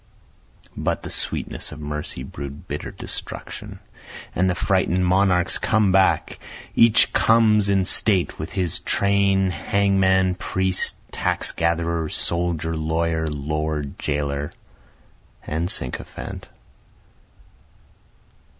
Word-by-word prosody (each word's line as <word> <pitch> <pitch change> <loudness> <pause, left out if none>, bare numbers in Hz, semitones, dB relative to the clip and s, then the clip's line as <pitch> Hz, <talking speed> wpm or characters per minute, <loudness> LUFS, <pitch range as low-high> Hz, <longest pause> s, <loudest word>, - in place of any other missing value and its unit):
But - - -2
the - - -5
sweetness - - -1
of 75 - -9
mercy 75 -3 -4
brew'd 70 +2 -8
bitter - - -4
destruction, - - -7 0.6
and 95 +1 +2
the 90 - 0
frighten'd 90 -1 +1
monarchs 95 0 +2
come 110 -3 +2
back, 95 0 +2 0.3
Each 115 -1 +5
comes 110 -3 +4
in 95 -2 +3
state 95 -1 +1
with 80 - -5
his 90 -4 -1
train, 100 -1 +2
hangman, 95 +1 +2
priest, 95 0 0 0.2
tax - - 0
gatherer, 85 -1 0
Soldier, 85 -1 -1
lawyer, 80 +1 0
lord, 75 0 -3
jailer, 70 0 -2 0.9
and 80 +3 -2
sycophant. 65 - -3
90 Hz, 100 wpm, -23 LUFS, 75-95 Hz, 0.9 s, Each